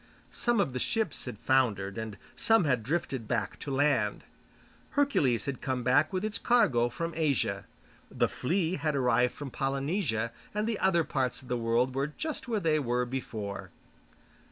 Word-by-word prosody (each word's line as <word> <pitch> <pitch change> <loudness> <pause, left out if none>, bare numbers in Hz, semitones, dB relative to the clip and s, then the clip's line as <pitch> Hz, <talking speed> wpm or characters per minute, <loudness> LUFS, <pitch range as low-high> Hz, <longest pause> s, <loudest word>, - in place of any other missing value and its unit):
Some 240 -3 +1
of 155 -10 +1
the 125 - -2
ships 220 - -1
had 125 -4 -6
foundered, 105 -7 +1
and 110 -3 -5 0.2
some 225 -3 +4
had 130 -6 +2
drifted 130 -3 -2
back - - -2
to - - -6
land. 140 +2 +1 0.7
Hercules 150 - +2
had 140 -2 -4
come 130 -2 -2
back 130 +5 +3
with 185 +2 -1
its 215 0 -1
cargo 150 - +3
from 165 +6 -4
Asia, 150 -6 0 0.4
The - - +1
Flea 175 +5 0
had 155 -2 -1
arrived 125 -2 +2
from 145 -3 -6
Polynesia, 135 - -1 0.2
and 210 0 0
the 225 -2 -1
other 180 -3 +3
parts 130 -4 -1
of 125 - -14
the 125 - +1
world 120 +2 +1
were 135 +2 0
just 295 - -4
where 225 -3 0
they 155 -4 +2
were 125 -2 0
before. 110 -5 -5
135 Hz, 170 wpm, -30 LUFS, 125-170 Hz, 0.7 s, some